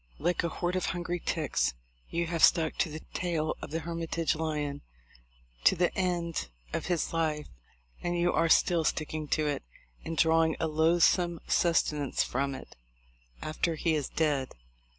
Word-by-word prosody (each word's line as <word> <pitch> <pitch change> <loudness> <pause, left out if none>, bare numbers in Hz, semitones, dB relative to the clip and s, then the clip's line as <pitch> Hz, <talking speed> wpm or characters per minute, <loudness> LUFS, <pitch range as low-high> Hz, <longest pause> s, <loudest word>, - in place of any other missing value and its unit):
Like 175 +4 0
a 170 - 0
horde 175 +2 -2
of 185 - 0
hungry 175 0 -2
ticks, 125 - 0 0.3
you 170 0 -1
have 165 -1 -1
stuck 160 -3 +5
to - - +2
the 155 +1 -7
tail 165 -3 -1
of - - -6
the 165 +2 -2
Hermitage 165 -1 -1
lion 150 -3 -2 0.8
to - - +7
the 175 0 +1
end 175 - -1 0.2
of - - -2
his 175 -3 0
life; 155 -2 0 0.6
and 175 0 -1
you 175 0 +2
are 165 0 +2
still 170 0 +4
sticking 155 0 -2
to 155 +1 +1
it, 145 -1 -1 0.4
and 165 0 -5
drawing 160 0 +4
a - - +1
loathsome 170 +2 +3
sustenance 150 -4 +2
from 135 +1 -1
it, - - -11 0.7
after 160 +2 -1
he 160 +1 +1
is 150 -4 -1
dead. 145 -5 0
165 Hz, 160 wpm, -30 LUFS, 155-170 Hz, 0.8 s, to